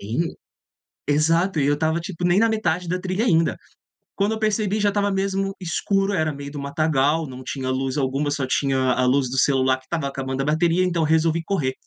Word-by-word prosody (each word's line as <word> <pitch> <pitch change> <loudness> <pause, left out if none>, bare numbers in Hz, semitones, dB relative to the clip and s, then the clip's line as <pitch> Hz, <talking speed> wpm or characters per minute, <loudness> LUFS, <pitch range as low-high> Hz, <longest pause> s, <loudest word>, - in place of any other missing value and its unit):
sim. 120 +12 -2 0.7
Exato, 165 +4 +2
e 140 - +2
eu 145 +1 +3
estava 160 +2 0
tipo 175 0 -4
nem 175 +1 +3
na 230 - +4
metade 180 -5 -1
da 180 +2 -1
trilha 185 +3 -2
ainda. 165 -7 +2 0.6
Quando 200 +2 +1
eu 220 - -4
percebi 215 -1 0
já 205 -1 +3
estava 205 0 0
mesmo 195 0 -1
escuro, 195 +2 0
era 155 -4 +1
meio 140 0 -8
do 145 - -6
matagal, 155 +1 +1
não 130 0 -9
tinha 130 0 -4
luz 130 +1 -1
alguma 135 +1 0
só 145 -2 -1
tinha 130 -1 +1
a 130 +1 +1
luz 130 0 +2
do 130 - -4
celular 130 -1 +3
que 130 - -20
estava 160 -1 -2
acabando 135 -1 -3
a 135 - -2
bateria 165 +4 +2
então 170 -3 0
resolvi 160 +1 +2
correr. 155 -8 -1
160 Hz, 205 wpm, -22 LUFS, 135-185 Hz, 0.7 s, na